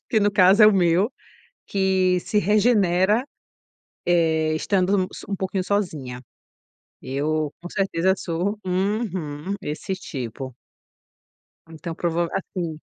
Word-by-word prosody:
que 220 - +2
no 205 0 +3
caso 195 +2 +6
é 210 - +10
o - - +4
meu, 185 +4 +3 0.5
que 190 -2 +2
se 210 - 0
regenera, 210 0 +3 0.8
eh, 160 -2 +2
estando 190 +4 +1
u 190 - +2
s - - -9
um 200 - -2
pouquinho 190 0 -2
sozinha. 160 -11 -2 0.8
Eu 150 +3 -1
com 175 - -7
certeza 190 -2 +1
sou 180 +5 -2
uhum, 185 -4 -2
esse 160 +5 -3
tipo. 130 - -6 1.2
Então 165 +1 -7
prova 170 0 -1
assim 175 -5 -4
185 Hz, 120 wpm, -23 LUFS, 160-200 Hz, 1.2 s, é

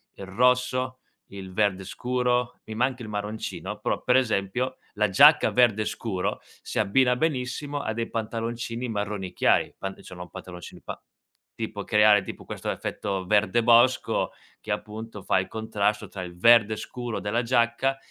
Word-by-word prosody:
il 100 - -8
rosso, 125 +4 +1 0.3
il 95 -1 -9
verde 100 -1 +1
scuro. 125 +3 -1
Mi 110 - -7
manca 125 +2 0
il 110 - -8
marroncino, 105 +1 -5
però - - -1
per 125 - +3
esempio 125 +1 0 0.2
la 105 0 +1
giacca 145 +11 +7
verde 110 -4 +3
scuro 100 -5 -3 0.2
si - - -6
abbina 125 +5 +3
benissimo 145 0 -2
a 110 - -2
dei 115 +1 -3
pantaloncini 115 +2 -3
marroni 105 -3 -3
chiari, - - +2
pan 95 0 -5
insomma 90 0 -10
pantaloncini 90 0 -10
pa - - -7 0.6
tipo 110 -2 -5
creare 105 -1 +5
tipo - - -9
questo - - -5
effetto 95 -2 -4
verde 110 +4 +3
bosco, 120 +2 +4 0.3
che - - -6
appunto, 110 0 -5
fa - - +2
il 95 - -3
contrasto 105 -1 -1
tra 95 -1 -7
il 85 -1 -9
verde 110 +1 +6
scuro 120 +1 -5
della 115 +4 -1
giacca 120 +2 +1
110 Hz, 150 wpm, -26 LUFS, 100-125 Hz, 0.6 s, giacca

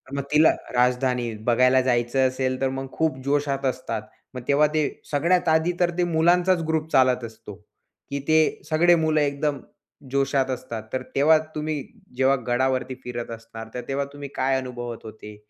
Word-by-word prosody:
मग 140 - -2
तिला 155 +1 +6 0.3
राजधानी 125 -1 +1
बघायला 125 +2 +4
जायचं 125 +1 +2
असेल, 130 0 -2
तर 135 - +2
मग 135 0 -4
खूप 160 -4 0
जोशात 140 -1 0
असतात. 125 -4 -2 0.3
मग 125 - -6
तेव्हा 150 +2 +4
ते 155 -2 +1 0.2
सगळ्यात 170 +5 +2
आधी 160 +2 +3
तर 175 0 +3
ते 180 - +2
मुलांचाच 175 +2 +3
ग्रुप 160 0 -1
चालत 130 -2 +3
असतो, 110 -2 -11 0.5
की 140 0 -3
ते 155 0 +3
सगळे 170 +2 +5
मुलं 155 -2 +2
एकदम 140 0 -1 0.5
जोशात 135 -1 +1
असतात. 120 -3 -5
तर 130 - -1
तेव्हा 155 +3 +5 0.2
तुम्ही 155 -1 -2 0.4
जेव्हा 135 +1 +4
गडावरती 130 +1 0
फिरत 120 -1 -5
असणार, 115 0 -9
तर 125 - -4
तेव्हा 140 +1 -1
तुम्ही 145 -1 -8
काय 130 0 +1
अनुभवत 120 -3 -6
होते? 105 -1 -10
135 Hz, 165 wpm, -24 LUFS, 125-155 Hz, 0.5 s, तिला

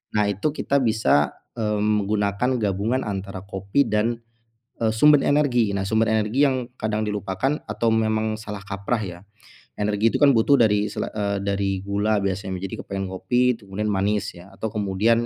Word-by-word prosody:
nah, 105 -1 +3
itu 100 +10 0
kita 140 - +1
bisa, 110 -10 +2 0.2
eee, 105 -2 0
menggunakan 105 +3 +1
gabungan 105 +5 0
antara 95 -2 -5
kopi 100 +7 0
dan, 115 +2 0 0.6
eee, 115 - +2
sumber 150 +4 +6
energi. 125 -7 +2
Nah, 100 - -1
sumber 110 +1 +2
energi 110 +6 +2
yang 130 -2 -2
kadang 110 0 -1
dilupakan 105 +7 -1
atau 110 +2 0
memang 110 -1 +1
salah 105 -2 -7
kaprah 100 +3 -2
ya, 85 -2 -7 0.6
energi 105 +2 +2
itu - - +2
kan 145 - +7
butuh 125 +6 +4
dari 105 -2 +3
sela - - -3
eee, 100 -2 -1
dari 100 -1 0
gula 105 +1 +1
biasanya, 95 -1 -2
jadi 95 - -5
kepengen 95 -1 -4
ngopi 125 +5 +1
kemudian 100 +2 -3
manis 100 +1 0
ya, 90 +3 -14
atau 110 +3 -4
kemudian 105 +3 +1
105 Hz, 165 wpm, -23 LUFS, 100-115 Hz, 0.6 s, kan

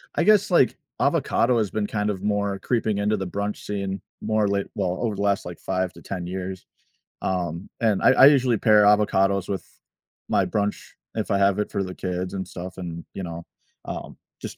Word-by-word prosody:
I - - +2
guess, 210 -2 +4
like, 155 -7 +4 0.2
avocado 120 0 +2
has 105 -3 +1
been 105 -1 -1
kind 105 -1 -1
of 95 -2 -3
more 100 -1 0
creeping 110 -1 0
into 105 +1 +1
the 95 - -3
brunch 100 +3 -3
scene 100 -2 -4 0.2
more 110 -1 +1
late 100 0 0
well, 90 0 -1
over 115 -4 -1
the 100 - -4
last, 100 -1 +1
like, 90 -1 -7
5 95 -1 -2
to - - -14
10 90 -3 -5
years. 95 0 -5 0.6
Um, 90 -1 -2
and 110 -4 +2
I - - +6
I - - +7
usually 130 -5 +4
pair 105 0 +5
avocados 100 -2 +3
with 95 - -2 0.7
my - - +3
brunch, 105 0 -1 0.4
if - - -2
I 100 - +2
have 100 0 +3
it 105 - -2
for 100 - -1
the 95 -1 -6
kids 90 0 -3
and 95 -2 -4
stuff, 90 +1 -8
and, 85 -2 -6
you 95 - -5
know, 85 -1 -6 0.4
um, - - -6 0.2
just - - -7
100 Hz, 200 wpm, -24 LUFS, 95-105 Hz, 0.7 s, I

